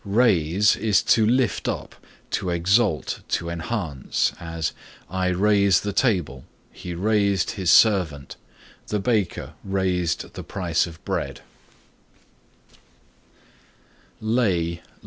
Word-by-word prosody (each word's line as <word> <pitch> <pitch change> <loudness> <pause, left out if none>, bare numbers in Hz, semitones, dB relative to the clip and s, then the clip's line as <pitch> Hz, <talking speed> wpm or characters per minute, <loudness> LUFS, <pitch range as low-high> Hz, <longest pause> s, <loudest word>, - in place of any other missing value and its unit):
Raise 100 -3 +3
is 105 -4 +2
to 110 -1 +3
lift 120 -5 +1
up, - - -4 0.4
to 90 - -1
exalt, 90 - +1
to 85 0 -1
enhance, 85 - -2
as 80 -2 -3 0.4
"I 95 0 0
raise 100 0 +3
the 105 -1 -3
table;" 90 - 0 0.3
"He 90 -1 -7
raised 100 0 +1
his 95 -4 -2
servant;" 85 - +3 0.5
"The 105 - -1
baker 100 -3 -1
raised 90 -3 -1
the - - -7
price 85 -3 -1
of 80 -1 -13
bread." - - -3
95 Hz, 100 wpm, -23 LUFS, 85-105 Hz, 0.5 s, Raise